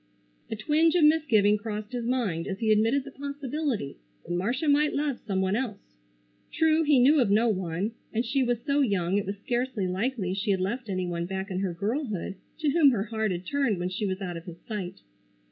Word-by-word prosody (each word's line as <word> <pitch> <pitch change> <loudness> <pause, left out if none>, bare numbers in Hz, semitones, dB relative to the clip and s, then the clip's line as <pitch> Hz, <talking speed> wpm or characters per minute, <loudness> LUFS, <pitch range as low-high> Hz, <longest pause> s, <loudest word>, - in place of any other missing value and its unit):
A - - -2
twinge 310 +9 +2
of 345 - +4
misgiving 235 -10 +4
crossed 210 0 -5
his 240 -2 -3
mind 220 -10 -1
as 190 - -3
he 220 0 +1
admitted 225 +6 +3
the 275 - -10
possibility 280 - -3 0.3
that 175 - -5
Marcia 240 - -1
might 295 +1 +3
love 285 -3 -1
some 190 -2 0
one 190 +1 +1
else. 225 - -4 0.6
True, 320 0 +3
he 295 -3 +4
knew 280 +5 +6
of 235 - +2
no 220 +4 +4
one, 185 +1 -1 0.2
and 230 +2 -1
she 270 +4 +1
was 245 -2 +1
so 285 0 +1
young 195 -6 +1
it 195 - -5
was 200 +1 -3
scarcely 240 -1 -2
likely 190 +1 -1
she 200 +2 -2
had 195 -2 +2
left 220 +5 -3
any 185 -1 -1
one 170 -1 -3
back 190 +1 -4
in 185 - -1
her 190 -3 -2
girlhood 210 - -2 0.2
to 310 -3 +1
whom 305 -2 +6
her 225 -7 0
heart 220 -1 -1
had 180 0 -3
turned 270 -3 +1
when 175 +1 -2
she 195 +3 -2
was 190 +1 -3
out 175 -3 -4
of 165 - -10
his 175 -2 -9
sight. 205 -5 -5
220 Hz, 215 wpm, -27 LUFS, 190-270 Hz, 0.6 s, knew